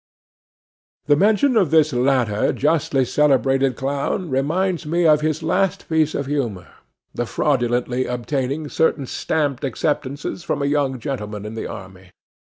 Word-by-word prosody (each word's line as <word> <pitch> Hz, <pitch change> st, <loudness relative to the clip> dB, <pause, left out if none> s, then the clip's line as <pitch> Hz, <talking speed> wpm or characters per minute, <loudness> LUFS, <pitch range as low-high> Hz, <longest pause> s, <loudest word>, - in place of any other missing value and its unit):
The 145 Hz, -, +4 dB
mention 220 Hz, -, +3 dB
of 195 Hz, -8 st, +3 dB
this 155 Hz, -2 st, +3 dB
latter 125 Hz, -4 st, +1 dB
justly 145 Hz, -3 st, +1 dB
celebrated 135 Hz, -1 st, +2 dB
clown 140 Hz, +5 st, -2 dB
reminds 170 Hz, +7 st, 0 dB
us 170 Hz, +3 st, 0 dB
of 150 Hz, -1 st, +5 dB
his 155 Hz, +1 st, -1 dB
last 190 Hz, +3 st, 0 dB
piece 155 Hz, -1 st, +1 dB
of 140 Hz, -, -2 dB
humour, 120 Hz, -11 st, -3 dB, 0.4 s
the 120 Hz, -, -3 dB
fraudulently 125 Hz, -2 st, 0 dB
obtaining 135 Hz, +4 st, -2 dB
certain 145 Hz, -2 st, +1 dB
stamped 145 Hz, 0 st, -2 dB
acceptances 145 Hz, +3 st, -2 dB
from 155 Hz, -, -2 dB
a -, -, +1 dB
young 140 Hz, -2 st, 0 dB
gentleman 105 Hz, -5 st, -5 dB
in 105 Hz, -, -6 dB
the 110 Hz, -, -5 dB
army. 95 Hz, -3 st, -10 dB
140 Hz, 140 wpm, -21 LUFS, 125-155 Hz, 0.4 s, of